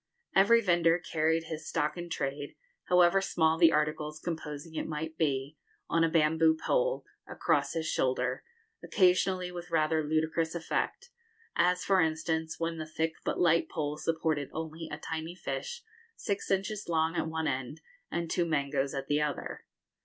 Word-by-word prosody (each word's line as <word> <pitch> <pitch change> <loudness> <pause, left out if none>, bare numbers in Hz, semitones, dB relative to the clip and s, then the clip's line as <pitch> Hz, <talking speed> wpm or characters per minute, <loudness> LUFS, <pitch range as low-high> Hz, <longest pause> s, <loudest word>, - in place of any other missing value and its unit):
Every 230 +5 +6
vendor 175 -4 +3
carried 160 -1 0
his 160 -1 -6
stock 150 -2 0
in 175 -1 -6
trade, 145 -2 -3 0.3
however 180 +1 +5
small 160 -4 +2
the 165 -2 +7
articles 150 0 -1
composing 160 -1 -5
it - - -3
might 160 +1 -4
be, 140 -2 -1 0.3
on 165 0 +3
a 165 - +3
bamboo 160 0 +3
pole, - - 0 0.2
across - - 0
his 165 -1 -2
shoulder, 130 -3 0 0.4
occasionally 185 -1 +2
with 175 0 -7
rather 160 -1 +2
ludicrous 160 +2 0
effect, 325 - -2 0.4
as, 180 +1 +2
for 195 -2 +4
instance, 160 0 -1
when 165 0 -2
the 155 - -5
thick 160 +1 -1
but - - -2
light 170 -1 +3
pole 150 -1 -2
supported 160 -3 -1
only 160 0 -5
a 150 - -4
tiny 160 +2 -5
fish 480 - -5 0.3
six 200 -3 -3
inches 195 +1 -1
long 160 0 +1
at - - 0
one 160 0 -2
end, 135 +3 -3 0.3
and 170 -1 -3
two 175 - +1
mangoes 140 -2 0
at 135 0 -3
the 145 +2 +1
other. 150 -1 -3
160 Hz, 160 wpm, -30 LUFS, 155-175 Hz, 0.4 s, the